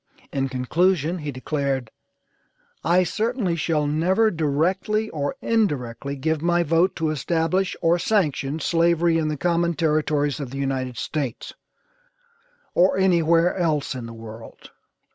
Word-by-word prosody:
In 135 -1 -1
conclusion 165 +6 +1
he 150 -2 -4
declared: 135 -2 -2 0.9
"I 175 +2 +4
certainly 220 -1 -1
shall 155 -2 0
never 185 +9 +2
directly 185 +8 0
or 145 -2 -2
indirectly 140 - -1
give 155 +2 -1
my 175 +1 +2
vote 165 +4 +2
to 160 -2 -1
establish 165 +5 0
or 170 +1 +3
sanction 155 -8 0
slavery 170 0 +2
in 155 - 0
the 155 -1 -2
common 170 +2 +1
territories 150 -3 0
of 140 -4 -5
the 135 - -7
United 130 -3 -2
States, 135 -4 -4 1.2
or 185 +2 +3
anywhere 170 -2 +3
else 160 -7 0
in 125 -3 -6
the 115 - -9
world." 115 0 -11
160 Hz, 130 wpm, -23 LUFS, 140-175 Hz, 1.2 s, I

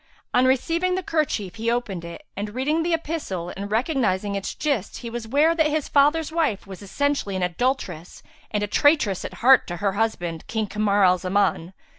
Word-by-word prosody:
On 250 - +4
receiving 335 +8 +1
the 375 - -2
kerchief 255 - -1
he 225 +1 -1
opened 230 -7 -2
it 170 0 -9
and, 205 +2 -5
reading 295 +5 +1
the 340 +1 -1
epistle 290 - -4
and 200 +1 -5
recognizing 215 - 0
its 195 -1 -4
gist 275 -10 -2
he 230 - -5
was 235 -1 -5
ware 295 +7 +3
that 320 -2 +2
his 305 -1 -1
father's 295 +3 +3
wife 315 - 0
was 195 -1 -10
essentially 205 0 -1
an 185 - -1
adulteress 180 - -2 0.3
and 210 0 -1
a - - -1
traitress 235 - +2
at - - -6
heart 265 0 +7
to 175 - -5
her 200 +2 0
husband, 180 -6 -2
King 220 -1 -1
Kamar 205 -1 +1
al 180 0 +4
Zaman. 185 -2 0
220 Hz, 190 wpm, -24 LUFS, 195-290 Hz, 0.3 s, heart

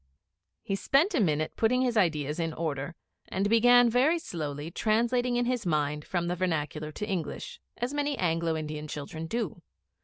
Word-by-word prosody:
He 195 - -1
spent 290 - +2
a 310 - +2
minute 155 -6 +1
putting 250 +3 +2
his 245 -2 0
ideas 155 -6 +1
in 165 -1 -1
order, 155 -1 -3 0.3
and 195 +2 0
began 245 +2 +6
very 260 +8 +3
slowly, 155 - -5
translating 240 +5 +1
in 245 0 +1
his 245 -1 0
mind 150 -3 0
from 175 -2 -1
the 175 +1 -1
vernacular 155 -4 -2
to 210 - -4
English, 200 - -4 0.2
as 245 +3 -2
many 290 -1 -1
Anglo 165 -2 0
Indian 155 -1 -5
children 155 +2 -6
do. 210 -5 -3
180 Hz, 165 wpm, -29 LUFS, 155-245 Hz, 0.3 s, began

